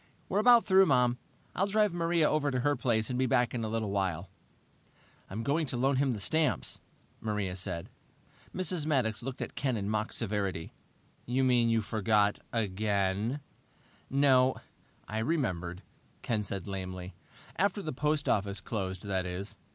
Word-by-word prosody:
"We're 195 - +1
about 240 +1 +6
through, 190 0 +6
Mom. 125 -3 +3 0.4
I'll 195 - +2
drive 210 -2 +2
Maria 170 -2 +2
over 150 -1 +1
to 130 -2 -1
her 145 +2 +2
place 110 -3 0
and 125 - -1
be 130 - +2
back 120 0 +2
in 120 -2 -2
a - - -1
little 110 -2 -2
while." 95 -3 -1 1.0
"I'm 110 +4 -4
going 150 +5 +1
to 125 - -2
loan 135 +2 +2
him 135 -1 +2
the 110 - -4
stamps," 155 +5 0 0.4
Maria 105 -4 -2
said. 90 -3 -3 0.6
Mrs. 180 -4 -1
Maddox 125 -8 +1
looked 130 +2 -4
at - - -7
Ken 130 -4 -1
in 100 -1 -3
mock 110 0 -1
severity. 100 -6 -2 0.5
"You 130 +2 +1
mean 120 -2 +4
you 115 -1 +2
forgot 105 0 +2
again?" 105 +3 0 0.7
"No 130 -2 +4 0.5
I 110 - -2
remembered," 95 - -1 0.4
Ken 110 -3 0
said 100 -2 -4
lamely. 95 -1 -5 0.4
"After 200 +1 +1
the 155 - -3
post 150 +2 0
office 100 -1 +1
closed, 95 -3 -4
that 95 -3 -1
is. 95 +3 -5
115 Hz, 160 wpm, -30 LUFS, 100-140 Hz, 1.0 s, about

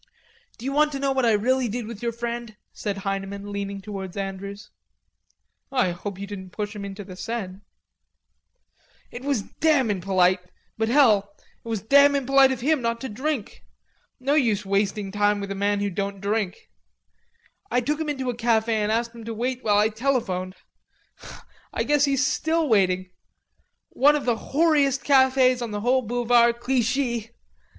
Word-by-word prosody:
"D'you 255 +4 -4
want 300 +1 +3
to 275 - -3
know 275 0 +1
what 265 -3 +1
I 225 - +4
really 250 +4 +1
did 235 +2 -4
with 220 -2 -8
your 235 -1 -1
friend?" 235 -1 -5 0.2
said 205 -2 -4
Heineman, 195 +1 -4
leaning 200 -1 -4
towards 195 -1 -7
Andrews. 200 +1 -6 1.0
"I 250 -9 +2
hope 185 +2 -6
you 200 - -5
didn't 195 -2 -8
push 210 +3 -5
him 205 - -6
into 200 +1 -7
the 185 -1 -10
Seine." 195 -2 -5 1.5
"It 245 - -8
was 275 -7 0
damn 285 -6 +1
impolite.... 185 -1 +2 0.4
But 225 0 -1
hell, 215 -7 +4 0.3
it - - -13
was 220 -4 -2
damn 280 +4 +6
impolite 275 0 +4
of 255 -2 -3
him 300 +1 +2
not 230 0 -1
to 265 - -4
drink.... 260 +1 -4 0.6
No 270 +3 0
use 225 -9 +2
wasting 200 0 0
time 205 0 +2
with 200 0 -5
a - - 0
man 200 +1 0
who 205 -1 -1
don't 200 +1 -3
drink. 200 -1 -3 1.0
I 245 - +2
took 295 +5 -1
him 310 - -2
into 265 -3 -2
a - - -8
cafe 225 -1 +1
and 210 +1 0
asked 230 +1 -1
him 230 -1 -10
to 225 0 -5
wait 250 +3 -2
while 205 -2 +3
I 210 +1 +4
telephoned. 215 -6 -1 1.2
I - - -1
guess 295 -1 +3
he's 280 0 +1
still 320 +3 0
waiting. 185 -5 +2 0.8
One 290 +3 +4
of 295 - -2
the 240 -2 +2
whoreiest 285 0 +1
cafes 260 -2 +4
on 235 - -3
the 205 -1 -4
whole 255 +3 +2
Boulevard 235 0 +2
Clichy." 240 -2 0
230 Hz, 170 wpm, -24 LUFS, 200-260 Hz, 1.5 s, damn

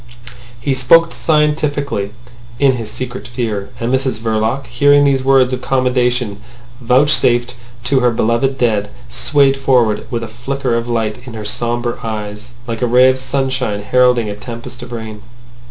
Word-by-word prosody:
He 135 +3 -1
spoke 165 +6 +4
scientifically 150 -8 0 0.5
in 140 +1 +4
his 115 -2 -6
secret 125 +3 -6
fear. 115 -5 -3
And 120 +2 -1
Mrs 130 -3 0
Verloc, 110 +4 -1
hearing 145 +4 +4
these 135 -2 +2
words 130 -1 +3
of 130 - -3
commendation 125 -5 0 0.4
vouchsafed 125 -1 +2 0.3
to 130 +2 +2
her 125 -1 +3
beloved 115 +4 0
dead, 105 -5 0 0.2
swayed 140 - +2
forward 125 -6 +1
with 115 -1 -3
a - - -5
flicker 125 +3 -3
of 115 0 -1
light 115 +1 -2
in 120 - -8
her 110 -1 -6
sombre 120 +2 -2
eyes, 110 +1 -6
like 115 -1 -5
a 125 - +2
ray 125 +2 +5
of 130 - -4
sunshine 130 -6 -2
heralding 125 0 +3
a 105 - -4
tempest 115 +3 -9
of 120 0 -9
rain. 110 -2 -7
125 Hz, 155 wpm, -16 LUFS, 115-135 Hz, 0.5 s, ray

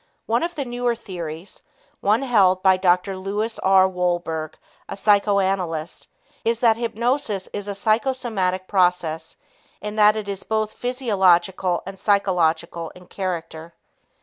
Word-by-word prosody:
One 230 +2 +1
of 345 +1 -3
the 285 -3 -3
newer 245 -1 -1
theories 175 -5 -8 0.4
one 215 +6 +2
held 195 -7 +3
by 190 -1 +6
Dr. 185 +1 +1
Lewis 205 +4 -3
R. 190 0 +5
Wolberg, 175 -4 -2 0.3
a 195 - -5
psychoanalyst 195 -5 +1 0.4
is 230 0 0
that 230 -2 +4
hypnosis 235 -3 -1
is 205 0 -4
a 200 - -4
psychosomatic 215 -4 0
process 175 -4 0 0.4
in 210 +1 -6
that 210 0 +6
it 215 -2 -4
is 200 -1 -3
both 215 -1 -1
physiological 190 -7 +1
and 195 0 -8
psychological 170 -5 +1
in 180 0 -14
character. 170 -3 -5
195 Hz, 130 wpm, -22 LUFS, 180-220 Hz, 0.4 s, by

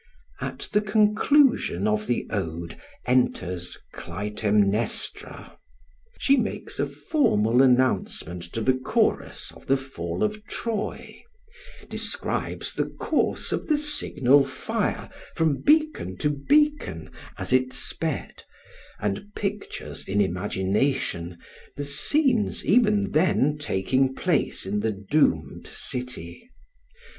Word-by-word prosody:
At - - -5
the 210 - +4
conclusion 210 - +3
of 105 0 0
the 120 - 0
ode 85 -4 -3 0.3
enters 90 -8 0 0.2
Clytemnestra. 105 +3 -1 0.6
She 275 0 +4
makes - - -3
a - - +1
formal 120 - +2
announcement 125 -9 +2
to 115 - -2
the 130 +4 +3
chorus 130 0 0
of - - -17
the 135 - +4
fall 85 -11 -4
of 215 0 -1
Troy; 220 -3 -4 0.7
describes - - -2
the - - -1
course - - -1
of - - -2
the 305 - +3
signal 145 - +3
fire - - -2 0.3
from 155 -4 +1
beacon 305 - +2
to 150 - +1
beacon 295 - +1 0.3
as - - -3
it 130 0 +3
sped, 155 +2 -3 0.6
and 105 - -2
pictures 205 0 -4
in 100 +2 0
imagination 95 0 0 0.4
the 145 +1 -4
scenes 230 - +1
even 210 -2 +3
then 150 -3 +3
taking 130 +1 +1
place 175 - 0
in 100 +2 -1
the 110 +1 0
doomed 100 +10 0
city. 125 - -5
130 Hz, 110 wpm, -25 LUFS, -, 0.7 s, the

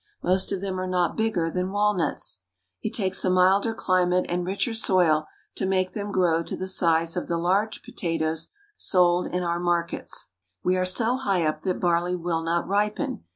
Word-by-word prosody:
Most 185 +1 +1
of 195 -2 -2
them 190 -2 -3
are 185 - -2
not 180 -2 +1
bigger 215 -7 0
than 180 +2 -2
walnuts. 200 - 0 0.4
It - - -2
takes 190 -3 0
a 185 - +2
milder 185 +4 +4
climate 180 -2 +2
and 175 +1 -1
richer 195 +6 -1
soil 175 -8 +2 0.3
to - - -2
make 185 -1 +1
them 205 -1 -4
grow 170 -4 +2
to - - -5
the 185 - -4
size 165 -2 +1
of 180 - -3
the 170 - 0
large 195 +6 0
potatoes 160 -2 -2 0.3
sold 180 - +2
in 180 0 -2
our 170 0 -1
markets. 175 -7 -2 0.3
We 185 - +2
are 185 0 +1
so 230 +7 +1
high 195 -10 0
up 155 - -1
that 185 -2 -1
barley 175 0 +1
will 170 -2 -1
not 165 +1 -1
ripen. 205 - -1
180 Hz, 185 wpm, -25 LUFS, 170-190 Hz, 0.4 s, milder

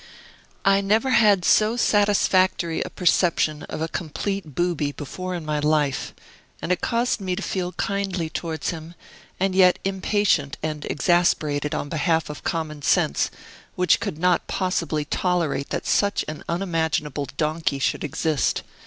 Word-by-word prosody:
I 195 0 +5
never 220 +6 +2
had 205 -7 +4
so 220 +2 +4
satisfactory 190 -6 +2
a - - -3
perception 170 -3 +1
of 155 - -3
a - - -1
complete 170 0 -4
booby 170 -5 0
before 185 +6 -6
in 170 -3 -6
my 150 -1 -1
life; 150 -3 0 0.4
and - - -3
it 180 - +1
caused 235 -1 0
me 185 -2 -1
to 215 - -5
feel 180 -1 -2
kindly 195 -4 -2
towards 160 -1 -3
him, 165 0 -9 0.4
and 190 0 +1
yet 185 -1 +5
impatient 195 -6 +1
and 155 -1 -3
exasperated 155 -5 +1
on - - -3
behalf 160 +1 0
of 150 - -10
common 155 -3 -3
sense, 70 - +2 0.5
which 180 0 +3
could 200 -9 -4
not 180 +1 +2
possibly 165 -5 -1
tolerate 165 -5 -1
that - - -3
such 200 0 +1
an 155 0 -6
unimaginable 160 -5 -1
donkey 155 -2 0
should 135 - -1
exist. 155 0 0
170 Hz, 145 wpm, -23 LUFS, 155-190 Hz, 0.5 s, I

